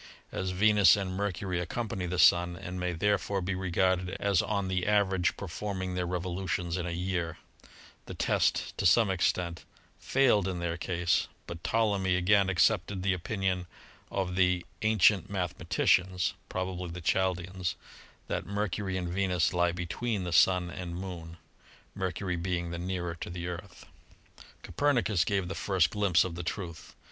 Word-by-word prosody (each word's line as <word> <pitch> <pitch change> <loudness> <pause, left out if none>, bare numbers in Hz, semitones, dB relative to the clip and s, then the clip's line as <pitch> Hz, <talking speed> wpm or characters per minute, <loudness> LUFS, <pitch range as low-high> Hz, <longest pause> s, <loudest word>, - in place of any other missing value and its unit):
As 95 - -2
Venus 105 +2 +5
and 95 -2 -3
Mercury 95 -2 -2
accompany 95 0 -3
the 90 +1 -3
Sun, 85 0 +5
and 90 0 -6
may 90 0 -1
there 100 +4 +1
fore 100 -1 -2
be 95 +1 -2
regarded 95 0 0
as 100 -3 +2
on 100 -2 -1
the 95 0 -1
average 95 -4 +2
performing 95 0 -4
their 90 -1 -1
revo 90 0 -3
lutions 90 -2 -2
in 90 -1 -2
a - - -2
year, 85 -1 -2 0.7
the - - -7
test - - +1
to - - +4
some 105 +2 +5
extent 85 -2 0 0.4
failed 120 -8 +3
in 95 -2 -2
their 85 -1 -2
62 85 - -9
ASTRONOMY 90 +1 -3
case, 85 - +3 0.2
but 85 0 -8
Ptolemy 100 -5 +1
again 95 +2 +3
accepted 95 +1 +2
the 95 -1 +2
opinion 90 0 -2 0.4
of 95 -2 -2
the 90 -1 +2 0.2
"an 110 0 +2
cient 95 0 +4
mathematicians" 90 +1 +1
— - - -37
probably 90 -1 -3
the 85 +2 -6
Chaldeans 90 0 0 0.3
— - - -25
that - - -3
Mercury 100 -1 -2
and 90 -1 -3
Venus 90 -3 +1
lie 90 -1 +2
between 95 +5 -3
the 90 -1 -3
Sun 90 0 +4
and 85 -2 -6
Moon, 85 -3 -7 0.6
Mer 95 -2 -2
cury 90 -2 -3
being 85 -1 -2
the 85 - -4
nearer 90 -1 -3
to - - -4
the 85 0 -5
Earth. 90 +1 -8 0.8
Copernicus 120 - +1
gave 95 -1 -1
the 95 - -4
first 95 -3 +1
glimpse 100 -6 +3
of 95 - -4
the 85 - -5
truth. 85 -1 -6
90 Hz, 170 wpm, -30 LUFS, 90-95 Hz, 0.8 s, Venus